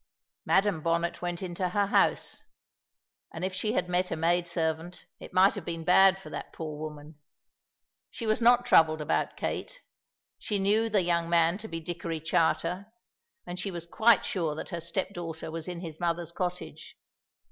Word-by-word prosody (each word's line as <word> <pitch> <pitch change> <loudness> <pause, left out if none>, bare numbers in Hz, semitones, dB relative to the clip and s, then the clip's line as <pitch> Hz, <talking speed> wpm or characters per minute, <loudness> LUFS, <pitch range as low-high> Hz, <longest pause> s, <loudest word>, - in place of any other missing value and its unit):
Madam 195 -4 +2
Bonnet 170 +1 0
went 175 +1 -3
into 180 0 -2
her 205 +2 +1
house, 200 - +1 0.9
and 165 +2 -4
if 190 - -3
she 215 +3 -1
had 180 - 0
met 180 +1 0
a - - -2
maid 170 +2 +1
servant, 165 0 -3
it - - -10
might 185 +2 +5
have 200 - -6
been 165 0 -5
bad 190 +2 +6
for 155 -5 -11
that 145 - -6
poor 155 -2 -6
woman. 150 0 -8 0.9
She 230 - -6
was 215 +1 +1
not 245 +1 +5
troubled 160 -8 +5
about 150 - -1
Kate. - - -4 0.6
She 210 - -2
knew 210 +3 +2
the 205 -3 +2
young 170 -1 +1
man 170 +2 +3
to 220 - -7
be 165 -5 -5
Dickory 165 0 -4
Charter, 165 +4 0 0.6
and 175 +1 -6
she 200 - -2
was 170 -3 -6
quite 225 +6 +4
sure 165 -5 -1
that - - -6
her 170 -3 -4
step 180 +4 -3
daughter 165 -2 -6
was 165 0 -6
in 175 -1 -5
his 160 -3 -7
mother's 170 -1 -1
cottage. 180 0 -5
175 Hz, 180 wpm, -29 LUFS, 165-190 Hz, 0.9 s, bad